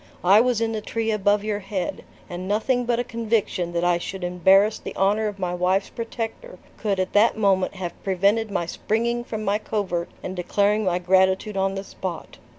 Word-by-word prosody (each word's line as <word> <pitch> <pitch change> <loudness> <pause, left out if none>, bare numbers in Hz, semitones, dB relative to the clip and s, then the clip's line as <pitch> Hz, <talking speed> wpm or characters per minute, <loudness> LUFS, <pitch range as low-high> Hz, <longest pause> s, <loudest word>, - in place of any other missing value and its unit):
I 195 +4 +7
was 245 -2 +1
in 225 0 +1
the 220 -1 -3
tree 225 +1 -2
above 205 0 +2
your 210 -1 -2
head, 195 -2 -4 0.2
and 180 +1 -6
nothing 245 +5 +1
but 240 0 +1
a 245 - 0
conviction 225 -7 -1
that 170 0 0
I 175 -1 +3
should 190 +1 -6
embarrass 190 +4 +4
the - - -8
honor 205 +3 +2
of 205 -1 -5
my 180 -2 -2
wife's 185 +2 0
protector 230 - -6 0.2
could 200 -3 -1
at 185 - -1
that 215 +2 +4
moment 195 -3 +2
have 180 -2 -6
prevented 200 +4 +1
my 185 -4 -1
springing 235 +7 -1
from 220 -2 -5
my 205 +2 +1
covert 190 -6 -2
and 185 - -5
declaring 205 +4 +1
my 180 -1 +1
gratitude 190 +3 +2
on 195 0 0
the 195 - -4
spot. 185 -3 -7
200 Hz, 195 wpm, -24 LUFS, 185-220 Hz, 0.2 s, I